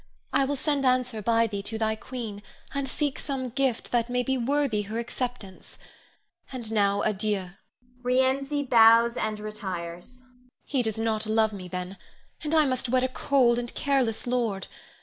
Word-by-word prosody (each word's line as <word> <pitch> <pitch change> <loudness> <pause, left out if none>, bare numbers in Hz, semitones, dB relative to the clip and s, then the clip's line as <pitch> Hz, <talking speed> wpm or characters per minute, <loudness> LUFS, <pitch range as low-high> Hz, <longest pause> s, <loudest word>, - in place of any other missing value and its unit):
I 275 - +3
will 285 +2 -1
send 285 0 0
answer 255 -3 +1
by 230 +2 +3
thee 205 -3 -3
to 220 +2 -3
thy 220 0 +1
queen, 220 -3 -6 0.3
and 280 -1 -1
seek 290 +1 -1
some 265 -3 -3
gift 265 -1 -1
that 235 -1 +1
may 250 0 +1
be 265 +2 0
worthy 260 -3 +1
her 210 +2 -5
acceptance. 235 -4 -5 0.7
And 240 -4 -4
now, 200 -2 +2
adieu! 205 -3 -1 0.5
[Rienzi 265 +3 +1
bows 230 -1 +6
and 215 -3 -1
retires.] 200 +1 -6 0.4
He 270 -3 0
does 220 -3 -1
not 220 -1 -1
love 220 0 +2
me, 185 -3 -7
then, 180 +1 -5 0.5
and 310 +1 0
I 310 -1 +5
must 255 -2 -1
wed 255 +1 +2
a - - +3
cold 250 -2 +3
and 240 0 -4
careless 265 -6 0
lord. 235 -6 -1
235 Hz, 165 wpm, -27 LUFS, 215-260 Hz, 0.7 s, bows